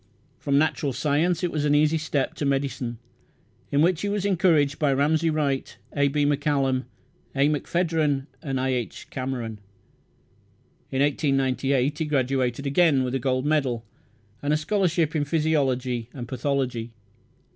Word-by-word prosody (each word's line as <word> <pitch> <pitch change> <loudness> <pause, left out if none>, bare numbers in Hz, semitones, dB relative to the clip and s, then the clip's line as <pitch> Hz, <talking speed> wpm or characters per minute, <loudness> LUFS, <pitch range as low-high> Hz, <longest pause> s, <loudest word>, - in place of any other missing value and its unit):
From 140 -1 +1
natural 145 -2 +1
science, 155 +6 +1
it 175 - 0
was 150 -2 -1
an 145 0 +3
easy 155 +2 +3
step 150 -3 -1
to - - -5
medicine, 135 -4 -1 0.7
in 145 +2 +3
which 175 -1 +2
he 205 - -1
was 200 -1 -1
encouraged 165 -7 +2
by 145 -3 +2
Ramsay 155 +4 +2
Wright, 145 -4 -1 0.2
A. 140 -1 +3
B. 145 +1 +1
Macallum, 140 -3 +1 0.5
A. 140 +1 +4
McPhedran, 155 -2 0 0.2
and 135 -3 -2
I. 130 +1 0
H. 125 -3 -3
Cameron. 125 -4 -4 1.3
In 135 +1 +1
1898 135 -1 +1
he 160 - 0
graduated 135 -2 0
again, 140 -1 +3
with 125 0 -2
a 135 - 0
gold 130 +1 0
medal, 135 -7 0 0.6
and 145 - -1
a 150 - +3
scholarship 170 -2 0
in 150 - +2
physiology 135 -6 0
and 125 -4 -6
pathology. 125 -3 -2
140 Hz, 145 wpm, -25 LUFS, 130-155 Hz, 1.3 s, A